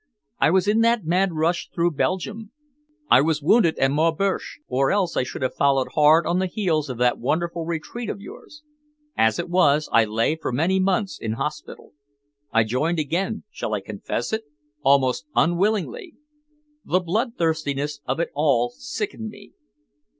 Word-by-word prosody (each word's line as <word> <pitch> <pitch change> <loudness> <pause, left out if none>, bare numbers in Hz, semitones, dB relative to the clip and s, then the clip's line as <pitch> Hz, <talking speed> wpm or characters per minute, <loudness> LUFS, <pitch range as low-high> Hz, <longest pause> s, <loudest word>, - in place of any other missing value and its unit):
I - - +4
was 185 +2 +2
in 215 +2 +3
that 230 -4 +2
mad 180 +2 +1
rush 165 +2 0
through 170 +1 0
Belgium. 200 +7 -2 0.6
I - - +8
was 155 0 0
wounded 170 -1 +4
at 135 0 +2
Maubeuge, 165 +6 0
or 135 +2 +1
else 195 -4 0
I - - +2
should 125 - -5
have 130 - -1
followed 135 -2 +2
hard 155 +2 +5
on 175 +1 +1
the 190 - 0
heels 170 -7 -1
of 125 - -5
that 125 0 +2
wonderful 165 +5 -2
retreat 170 +8 -4
of - - -4
yours. 300 +8 -12 0.5
As 110 -1 +2
it - - -3
was, 155 -4 +3
I 115 -1 +5
lay 115 +8 0
for 160 - -4
many 170 +9 +1
months 190 -2 0
in 110 -1 -2
hospital. 150 +6 -6 0.6
I 115 -1 +4
joined 140 +10 -1
again 175 +8 -2
shall 110 - -3
I - - -2
confess 110 - -4
it? 220 0 -2 0.4
almost 135 - +2
unwillingly. 210 - 0 0.7
The 185 - +1
bloodthirstiness 160 - -1
of 130 +4 -1
it 170 - -1
all 135 -5 +2
sickened - - -5
me. - - -14
160 Hz, 165 wpm, -23 LUFS, 135-190 Hz, 0.7 s, I